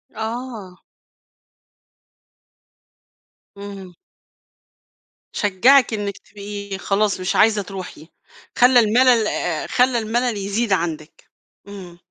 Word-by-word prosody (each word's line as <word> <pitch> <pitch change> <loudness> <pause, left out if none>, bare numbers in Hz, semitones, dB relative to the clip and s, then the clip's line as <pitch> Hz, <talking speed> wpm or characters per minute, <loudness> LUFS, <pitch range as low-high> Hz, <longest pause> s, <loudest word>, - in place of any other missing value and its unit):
آه. 220 -5 -7 2.7
امم. 200 -2 -10 1.4
شجعِك 240 +6 +3
إنك 205 -2 -4
تبقي 200 -1 -8
خلاص 195 +1 0
مش 185 0 -2
عايزة 215 -1 +3
تروحي، 185 -5 -9 0.5
خلَّى 245 0 +6
الملل 235 0 +3
آآ، 170 -6 -3
خلَّى 250 0 +2
الملل 230 +1 -1
يزيد 200 +2 -1
عندك، 165 -3 -4 0.4
امم. 185 -4 -11
205 Hz, 85 wpm, -20 LUFS, 190-230 Hz, 2.7 s, خلَّى